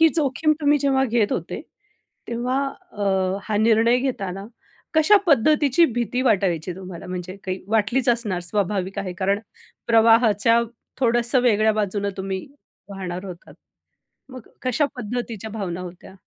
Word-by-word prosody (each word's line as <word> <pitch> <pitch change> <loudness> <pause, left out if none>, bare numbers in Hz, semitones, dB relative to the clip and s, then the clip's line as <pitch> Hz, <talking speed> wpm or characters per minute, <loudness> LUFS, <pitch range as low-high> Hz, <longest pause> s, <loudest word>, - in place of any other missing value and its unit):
ही 325 - +7
जोखीम 305 0 +2
तुम्ही 295 0 +3
जेव्हा 270 -1 +2
घेत 230 -4 +1
होते, - - -4 0.7
तेव्हा 245 +3 -1 0.3
अ, 205 -1 -4 0.4
हा 215 -2 -1
निर्णय 225 +2 +4
घेताना, 195 -7 -3 0.5
कशा 315 +7 +6
पद्धतीची 295 +2 +4
भीती 245 +2 -1
वाटायची 185 - +1
तुम्हाला? 185 -2 -9
म्हणजे 180 +1 -6
काही 185 0 -4
वाटलीच 225 +4 +1
असणार 230 -7 0
स्वाभाविक 195 +1 -2
आहे. 195 -2 -3
कारण 195 +2 0 0.5
प्रवाहाच्या 230 -1 +4 0.4
थोडंसं 240 0 +2
वेगळ्या 220 -2 +3
बाजूनं 205 -1 -1
तुम्ही 190 -1 -4 0.4
वाहणार 185 -2 -5
होता, 180 -2 -10 0.8
मग 255 -3 -11 0.2
कशा 255 +3 +1
पद्धतीच्या 230 -2 -5
भावना 190 -5 -4
होत्या? 180 +1 -10
220 Hz, 130 wpm, -22 LUFS, 195-250 Hz, 0.8 s, ही